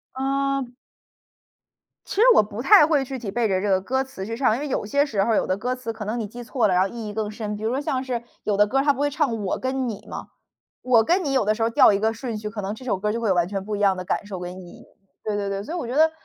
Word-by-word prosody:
嗯 275 Hz, -1 st, -1 dB, 1.3 s
其 -, -, -6 dB
实 420 Hz, -, +2 dB
我 -, -, +7 dB
不 210 Hz, +2 st, -6 dB
太 390 Hz, 0 st, +7 dB
会 295 Hz, -4 st, +2 dB
具 265 Hz, -1 st, -5 dB
体 215 Hz, -4 st, -5 dB
背 235 Hz, 0 st, +1 dB
着 190 Hz, -1 st, 0 dB
这 205 Hz, -, -1 dB
个 190 Hz, -1 st, +3 dB
歌 265 Hz, +7 st, -1 dB
词 260 Hz, -8 st, -8 dB
去 230 Hz, +1 st, -4 dB
唱， 245 Hz, -3 st, +2 dB
因 -, -, -4 dB
为 295 Hz, -, -3 dB
有 250 Hz, -, -2 dB
些 285 Hz, +7 st, +2 dB
时 205 Hz, -8 st, 0 dB
候 230 Hz, -, +1 dB
儿 -, -, +3 dB
有 -, -, +1 dB
的 185 Hz, -, 0 dB
歌 250 Hz, +5 st, -2 dB
词 230 Hz, -3 st, -5 dB
可 215 Hz, -, -7 dB
能 230 Hz, +3 st, -2 dB
你 215 Hz, -, -3 dB
记 240 Hz, +3 st, -9 dB
错 240 Hz, -2 st, +1 dB
了 185 Hz, -, +1 dB
然 180 Hz, -, +4 dB
后 195 Hz, -, -2 dB
意 230 Hz, -2 st, -6 dB
义 205 Hz, -, -6 dB
更 215 Hz, -1 st, -2 dB
深。 210 Hz, -1 st, -5 dB
比 210 Hz, -, -8 dB
如 220 Hz, -, +1 dB
说 260 Hz, +3 st, -1 dB
像 265 Hz, -2 st, -2 dB
是 245 Hz, -2 st, -3 dB, 0.2 s
有 205 Hz, -2 st, 0 dB
的 205 Hz, -, +6 dB
歌 270 Hz, +6 st, 0 dB
儿 -, -, +2 dB
它 290 Hz, -, +4 dB
不 275 Hz, -, -5 dB
会 290 Hz, 0 st, +2 dB
唱 280 Hz, -6 st, 0 dB
“我 -, -, -1 dB
跟 260 Hz, 0 st, -1 dB
你” 210 Hz, -2 st, -6 dB
吗， -, -, -7 dB, 0.5 s
“我 240 Hz, -3 st, +4 dB
跟 360 Hz, -, +2 dB
你” 280 Hz, -, -1 dB
有 260 Hz, -6 st, +2 dB
的 215 Hz, -, +3 dB
时 225 Hz, -, -6 dB
候 225 Hz, -, +3 dB
调 230 Hz, -, +6 dB
一 200 Hz, -, +1 dB
个 220 Hz, +1 st, +2 dB
顺 230 Hz, -1 st, -5 dB
序 210 Hz, 0 st, -5 dB
可 210 Hz, -1 st, -5 dB
能 195 Hz, +2 st, -3 dB
这 240 Hz, -, -11 dB
首 205 Hz, -6 st, 0 dB
歌 210 Hz, +2 st, -1 dB
就 235 Hz, -, -3 dB
会 220 Hz, -, 0 dB
有 185 Hz, -, +3 dB
完 175 Hz, 0 st, +2 dB
全 195 Hz, -1 st, -4 dB
不 210 Hz, 0 st, -3 dB
一 -, -, -4 dB
样 195 Hz, -2 st, +3 dB
的 185 Hz, -, -5 dB
感 200 Hz, -, -2 dB
受 195 Hz, -3 st, -6 dB
跟 180 Hz, +1 st, -7 dB
意 175 Hz, -, -12 dB
义。 -, -, -14 dB, 0.4 s
对 210 Hz, -1 st, -2 dB
对 200 Hz, -1 st, -2 dB
对， 195 Hz, 0 st, -3 dB
所 315 Hz, -, -8 dB
以 -, -, -2 dB
我 330 Hz, -, -3 dB
觉 245 Hz, +3 st, -4 dB
得， 315 Hz, +1 st, +5 dB
225 Hz, 355 characters per minute, -23 LUFS, 205-265 Hz, 1.3 s, 我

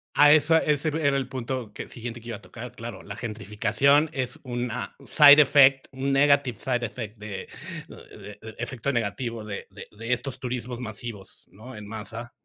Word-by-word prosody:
A 145 Hz, 0 st, +7 dB
esa 155 Hz, +1 st, +5 dB
ese, 150 Hz, 0 st, 0 dB
era 150 Hz, -2 st, +1 dB
el 135 Hz, -, -2 dB
punto 125 Hz, -3 st, -4 dB
que -, -, -7 dB
siguiente 120 Hz, 0 st, -7 dB
que 115 Hz, -, -10 dB
iba 115 Hz, -, -4 dB
a -, -, -19 dB
tocar, 115 Hz, +6 st, -9 dB
claro, 115 Hz, -4 st, -8 dB
la 100 Hz, -, -8 dB
gentrificación 110 Hz, +7 st, +1 dB
es 130 Hz, -3 st, -3 dB
una 120 Hz, -1 st, -4 dB
side 145 Hz, +1 st, +8 dB
effect, 135 Hz, -2 st, +5 dB
un 135 Hz, +1 st, -2 dB
negative 140 Hz, -4 st, +3 dB
side 125 Hz, -2 st, -1 dB
effect, 110 Hz, -1 st, -7 dB
de 105 Hz, -2 st, -6 dB, 0.6 s
eh, -, -, -12 dB, 0.2 s
efecto 125 Hz, +2 st, -3 dB
negativo 115 Hz, -1 st, -2 dB
de 100 Hz, -2 st, -6 dB
de 100 Hz, +1 st, -11 dB
de 115 Hz, +3 st, -2 dB
estos 130 Hz, +1 st, -4 dB
turismos 125 Hz, -1 st, -4 dB
masivos, 110 Hz, -3 st, -8 dB
¿no? 110 Hz, +8 st, -12 dB
en 105 Hz, -1 st, -9 dB
masa. 115 Hz, +2 st, -7 dB
120 Hz, 175 wpm, -26 LUFS, 110-135 Hz, 0.6 s, side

